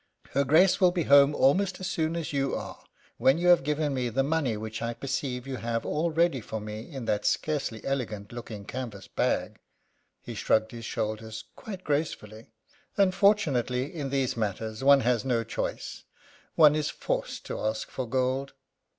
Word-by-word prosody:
"Her 140 - +2
Grace 165 +9 +4
will 180 - +7
be 175 -1 -1
home 140 0 +6
almost 185 +7 +2
as 185 - -5
soon 160 -2 -1
as 165 -3 -4
you 135 -1 0
are - - -7 0.3
when 135 +3 +4
you 175 +1 +2
have 175 - +7
given 150 0 0
me 125 -2 -1
the 135 +4 +1
money 140 -6 0
which 110 +1 -6
I 115 0 -2
perceive 135 -2 -3
you 135 -1 -4
have 115 0 -2
all 160 +3 0
ready 165 -4 +2
for 110 +1 -5
me 105 +5 -7
in 135 -5 -6
that 105 -2 0
scarcely 140 -8 -1
elegant 110 -7 -3
looking 115 -4 -8
canvas 115 -6 -6
bag." - - -1 0.6
He - - -8
shrugged 110 0 +1
his 115 -1 -8
shoulders 110 +1 -4
quite 195 -4 -8
gracefully. 120 -8 -3 0.5
"Unfortunately, 185 - +2
in 145 -5 -4
these 135 -2 0
matters 110 +2 -3
one 140 0 +7
has 120 -1 +1
no 120 -3 +1
choice - - -4 0.5
one 150 -2 +7
is 155 -1 0
forced - - -3
to - - -4
ask 110 0 -2
for 130 -3 -4
gold." 130 +2 0
135 Hz, 175 wpm, -28 LUFS, 115-155 Hz, 0.6 s, will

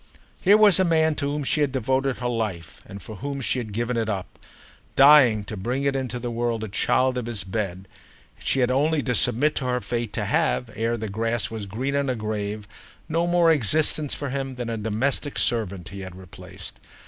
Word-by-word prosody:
Here 200 +3 +6
was 210 -4 +6
a - - +5
man 160 -2 +3
to 140 0 -1
whom 150 0 -2
she 150 +3 +1
had 145 -2 +2
devoted 130 +1 0
her 125 - -3
life 105 -9 -4
and 100 - -9
for 110 - -9
whom 140 +4 -4
she 130 0 0
had 110 -3 -6
given 120 +3 -2
it 110 -1 -1
up—dying 120 +4 +2
to 105 - -7
bring 125 +8 -2
into 135 -3 -1
the 120 0 -4
world 115 -1 -1
a - - -3
child 125 +5 +1
of 120 - -6
his 110 -4 -3
bed; 95 -1 -4 0.5
and - - -18
she 135 - +1
had 125 - +2
had - - +1
only 150 +1 +2
to 125 - 0
submit 125 +6 +2
to 135 - -2
her 125 0 0
fate 120 -2 -3
to - - -2
have, 60 0 0
ere 115 +2 -1
the 110 -1 -4
grass 115 +3 -1
was 110 -3 -5
green 130 +8 -3
on 140 0 +1
her 130 - 0
grave, 105 -1 -4 0.4
no 165 +2 0
more 175 -1 +4
existence 150 +2 +1
for 140 -3 -4
him 135 -1 -3
than 120 -2 -4
a 115 - -2
domestic 120 +7 -1
servant 100 -6 0
he 100 -1 -8
had 95 -2 -8
replaced. 95 0 -11
120 Hz, 215 wpm, -24 LUFS, 105-140 Hz, 0.5 s, Here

